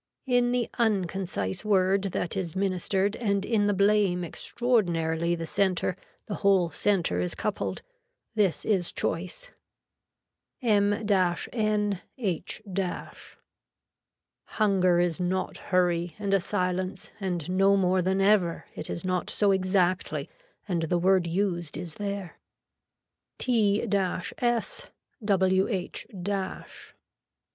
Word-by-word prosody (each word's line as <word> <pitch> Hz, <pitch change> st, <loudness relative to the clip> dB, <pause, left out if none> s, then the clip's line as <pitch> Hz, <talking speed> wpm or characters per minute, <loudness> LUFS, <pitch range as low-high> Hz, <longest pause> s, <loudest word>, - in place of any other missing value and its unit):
In 245 Hz, -2 st, +2 dB
the 245 Hz, -1 st, +1 dB
unconcise 190 Hz, -, 0 dB
word 195 Hz, -1 st, +2 dB
that 180 Hz, -2 st, -2 dB
is 180 Hz, -4 st, -3 dB
ministered 195 Hz, +1 st, 0 dB
and 200 Hz, -4 st, 0 dB
in 210 Hz, -3 st, +2 dB
the 205 Hz, -, +2 dB
blame 200 Hz, -2 st, +3 dB
extraordinarily 170 Hz, -6 st, 0 dB
the 165 Hz, -1 st, -4 dB
center 185 Hz, -1 st, +1 dB, 0.3 s
the 210 Hz, -, -5 dB
whole 190 Hz, -4 st, +3 dB
center 175 Hz, -, +1 dB
is 90 Hz, 0 st, -1 dB
coupled. 210 Hz, -, -3 dB, 0.5 s
This 205 Hz, -6 st, +1 dB
is 190 Hz, -5 st, +1 dB
choice. -, -, -3 dB, 1.1 s
M 205 Hz, -5 st, +3 dB
N 205 Hz, 0 st, 0 dB, 0.2 s
H. 190 Hz, -6 st, -2 dB, 2.0 s
Hunger 185 Hz, -5 st, +3 dB
is 175 Hz, -1 st, +1 dB
not 185 Hz, +1 st, -1 dB
hurry 175 Hz, -2 st, 0 dB
and 200 Hz, -2 st, -1 dB
a 195 Hz, -, +5 dB
silence 185 Hz, +1 st, -2 dB
and 180 Hz, -6 st, -2 dB
no 195 Hz, +1 st, +4 dB
more 185 Hz, -1 st, +2 dB
than 190 Hz, +2 st, +1 dB
ever, 195 Hz, -4 st, +3 dB
it -, -, -6 dB
is 170 Hz, -, -4 dB
not 185 Hz, -1 st, -1 dB
so 205 Hz, -1 st, +3 dB
exactly 185 Hz, -1 st, +1 dB, 0.4 s
and 175 Hz, -4 st, 0 dB
the 165 Hz, +2 st, +1 dB
word 185 Hz, 0 st, +3 dB
used 175 Hz, -2 st, -1 dB
is 175 Hz, -3 st, -5 dB
there. 200 Hz, -3 st, -5 dB, 1.0 s
T 220 Hz, -4 st, +2 dB
S 195 Hz, -4 st, -1 dB, 0.9 s
WH 190 Hz, -1 st, +1 dB
190 Hz, 110 wpm, -27 LUFS, 175-205 Hz, 2.0 s, a